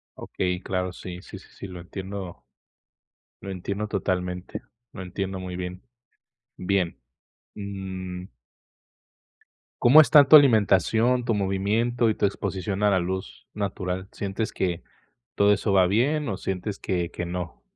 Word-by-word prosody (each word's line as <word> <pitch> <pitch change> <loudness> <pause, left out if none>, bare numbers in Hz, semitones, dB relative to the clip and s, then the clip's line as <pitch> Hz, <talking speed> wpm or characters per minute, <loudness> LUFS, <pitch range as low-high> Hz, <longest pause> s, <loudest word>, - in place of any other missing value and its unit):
Okey, 90 -1 -3
claro, 90 -1 -2
sí, 90 0 -8
sí, 100 - -10
sí, 95 - -16
sí, - - -9
lo 90 -2 -9
entiendo 95 0 -7 1.0
lo 100 - -7
entiendo 100 +3 -4
totalmente, 90 -2 -3 0.3
lo 95 - -7
entiendo 95 +1 -4
muy 90 -1 -6
bien. 90 +1 -6 0.7
Bien, 95 -2 -1 0.6
mm. 95 -2 -6 1.5
¿Cómo 135 +6 +8
está 150 -1 +7
tu 155 - +9
alimentación, 115 -1 +5
tu 115 -2 0
movimiento 105 +5 +1
y 110 - 0
tu - - +1
exposición 100 0 -2
a 105 - +4
la 100 - +3
luz 95 +2 -5
natural? 95 -2 -3
¿Sientes 100 +2 -3
que 90 -2 -2 0.5
todo 100 0 +4
eso 100 +1 -1
va 95 -2 +5
bien, 135 +10 +1
o 100 - -2
sientes 95 +2 -4
que 90 -2 -2
que 90 - -5
no? 90 0 -5
95 Hz, 140 wpm, -25 LUFS, 90-105 Hz, 1.5 s, tu